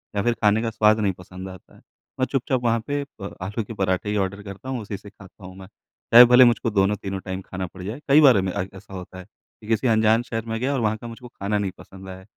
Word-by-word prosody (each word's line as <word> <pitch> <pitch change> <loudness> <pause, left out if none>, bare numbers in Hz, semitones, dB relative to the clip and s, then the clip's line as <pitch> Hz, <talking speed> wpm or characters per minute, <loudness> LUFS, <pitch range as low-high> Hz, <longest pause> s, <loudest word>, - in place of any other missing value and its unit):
या 100 - +1
फिर 120 0 +2
खाने 105 +1 +4
का 115 - -1
स्वाद 110 -1 +3
नहीं 100 -2 +1
पसंद 95 +1 -10
आता 95 -1 -14
है, - - -20 0.4
मैं 130 - +2
चुपचाप 130 -1 -1
वहाँ 115 -1 +2
पे 145 0 -1
अ, 105 -8 -9
आलू 105 +5 -3
के 115 - -9
पराठे 95 0 -1
ही 105 - -1
ऑर्डर 100 +1 -2
करता 100 +6 -9
हूँ, 125 -3 -3
उसी 100 -1 -6
से 100 - -13
खाता 100 -1 -16
हूँ 95 - -11
मैं। 95 - -11 0.5
चाहे 120 +1 +11
भले 125 +1 +7
मुझको 120 -1 +2
दोनों-तीनों 100 -1 0
टाइम 95 0 -4
खाना 95 0 -6
पड़ 90 +1 -13
जाए। 110 +8 -6
कई 145 +3 +6
बार 130 -8 +6
मे 95 0 -2
आइक 95 0 -3
ऐसा 95 +1 -13
होता 90 0 -9
है 90 - -11
कि 105 - -22
किसी 115 +2 +1
अनजान 110 0 +3
शहर 115 -1 -5
में 115 0 -3
गया 135 +3 -1
और 135 - -1
वहाँ 110 -1 0
का 120 - -9
मुझको 115 +2 -10
खाना 105 -2 -3
नहीं 100 -2 -2
पसंद 95 0 -13
आया, 95 0 -10
105 Hz, 265 wpm, -23 LUFS, 95-115 Hz, 0.5 s, चाहे